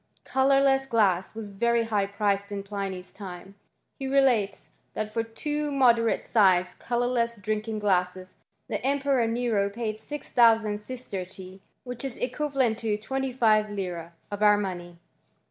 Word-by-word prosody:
Colourless 270 Hz, 0 st, +3 dB
glass 200 Hz, -6 st, +1 dB
was 215 Hz, -2 st, -7 dB
very 235 Hz, +3 st, +1 dB
high 210 Hz, -3 st, 0 dB
priced 200 Hz, 0 st, -1 dB
in 200 Hz, -1 st, -4 dB
Pliny's 195 Hz, -2 st, -5 dB
time. 190 Hz, -1 st, -9 dB, 0.5 s
He 270 Hz, -, -3 dB
relates, 255 Hz, -8 st, +2 dB, 0.2 s
that 215 Hz, 0 st, -4 dB
for 230 Hz, -, +1 dB
two 295 Hz, +6 st, -3 dB
moderate 235 Hz, -4 st, +3 dB
sized 185 Hz, -4 st, +3 dB
colourless 240 Hz, -1 st, 0 dB
drinking 215 Hz, +1 st, -3 dB
glasses 185 Hz, -2 st, 0 dB, 0.3 s
the -, -, -3 dB
Emperor 275 Hz, -3 st, +1 dB
Nero 225 Hz, -4 st, 0 dB
paid 215 Hz, 0 st, -4 dB
6000 225 Hz, -6 st, +2 dB
sistertii,.. 190 Hz, -5 st, -7 dB, 0.2 s
which 245 Hz, 0 st, -7 dB
is 270 Hz, -3 st, -4 dB
equivalent 260 Hz, -3 st, 0 dB
to 220 Hz, -2 st, -1 dB
25Z. 215 Hz, -8 st, 0 dB, 0.2 s
of 205 Hz, 0 st, -5 dB
our 210 Hz, -1 st, +6 dB
money. 175 Hz, -4 st, -5 dB
215 Hz, 130 wpm, -27 LUFS, 200-245 Hz, 0.5 s, our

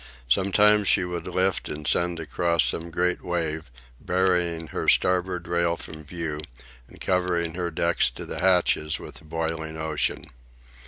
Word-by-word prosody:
Sometimes 100 Hz, +8 st, +4 dB
she 90 Hz, -, +4 dB
would 90 Hz, -1 st, -5 dB
lift 95 Hz, 0 st, 0 dB
and 75 Hz, 0 st, -6 dB
send 85 Hz, +2 st, +1 dB
across 85 Hz, +2 st, +1 dB
some 85 Hz, +1 st, 0 dB
great 90 Hz, +2 st, 0 dB
wave, 80 Hz, -4 st, -2 dB, 0.3 s
burying 90 Hz, -3 st, 0 dB
her -, -, 0 dB
starboard 90 Hz, -1 st, +2 dB
rail 85 Hz, 0 st, +1 dB
from 80 Hz, -1 st, -9 dB
view, 75 Hz, -1 st, -4 dB, 0.5 s
and -, -, -16 dB
covering 90 Hz, -3 st, 0 dB
her 90 Hz, 0 st, -2 dB
deck 85 Hz, +1 st, -1 dB, 0.2 s
to -, -, -7 dB
the -, -, -5 dB
hatches 90 Hz, -4 st, +3 dB
with -, -, -9 dB
the -, -, -13 dB
boiling 80 Hz, 0 st, -3 dB
ocean. 80 Hz, -1 st, -1 dB
85 Hz, 150 wpm, -25 LUFS, 80-90 Hz, 0.5 s, Sometimes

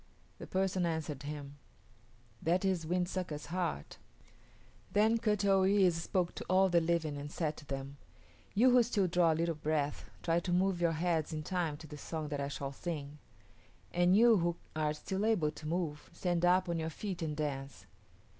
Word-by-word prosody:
The -, -, -8 dB
person 190 Hz, -1 st, 0 dB
answered 160 Hz, -4 st, -2 dB
him, 145 Hz, -1 st, -7 dB, 0.8 s
"That 180 Hz, +4 st, +1 dB
is 180 Hz, -4 st, 0 dB
Wind 180 Hz, +1 st, +1 dB
Sucker's 180 Hz, -5 st, -4 dB
heart." 170 Hz, -, -3 dB, 0.9 s
Then 220 Hz, +3 st, +3 dB
Kut 210 Hz, -3 st, +1 dB
o 195 Hz, -1 st, +4 dB
yis´ 190 Hz, -1 st, +4 dB
spoke 170 Hz, +2 st, -1 dB
to -, -, -7 dB
all 190 Hz, +1 st, +5 dB
the 170 Hz, -1 st, +4 dB
living 165 Hz, -3 st, 0 dB
and 145 Hz, +1 st, -6 dB
said 155 Hz, -2 st, -2 dB
to 145 Hz, -, -12 dB
them, 135 Hz, +1 st, -5 dB, 0.6 s
"You 250 Hz, +5 st, +6 dB
who 250 Hz, 0 st, +7 dB
still 220 Hz, -4 st, +1 dB
draw 175 Hz, -1 st, +3 dB
a -, -, +1 dB
little 165 Hz, +1 st, 0 dB
breath 150 Hz, -1 st, -1 dB, 0.2 s
try 165 Hz, 0 st, +2 dB
to 175 Hz, -, -4 dB
move 180 Hz, 0 st, +2 dB
your 170 Hz, -1 st, +3 dB
heads 160 Hz, -1 st, 0 dB
in 155 Hz, 0 st, -3 dB
time 165 Hz, -3 st, -1 dB
to 155 Hz, -, -11 dB
the 150 Hz, -1 st, -9 dB
song 155 Hz, -1 st, -4 dB
that 145 Hz, -1 st, -2 dB
I 140 Hz, -, -1 dB
shall 140 Hz, -1 st, -4 dB
sing; 150 Hz, -1 st, -5 dB, 0.7 s
and 175 Hz, +2 st, +4 dB
you 230 Hz, -1 st, +7 dB
who 170 Hz, -1 st, 0 dB, 0.2 s
are 155 Hz, -1 st, 0 dB
still 190 Hz, +6 st, -3 dB
able 200 Hz, -9 st, +2 dB
to 155 Hz, 0 st, -9 dB
move 160 Hz, -3 st, -3 dB
stand 175 Hz, 0 st, 0 dB
up 185 Hz, +1 st, +4 dB
on 170 Hz, -1 st, -1 dB
your 160 Hz, 0 st, -2 dB
feet 185 Hz, +2 st, -5 dB
and 155 Hz, -2 st, -3 dB
dance. 140 Hz, -3 st, -4 dB
170 Hz, 190 wpm, -33 LUFS, 150-185 Hz, 0.9 s, who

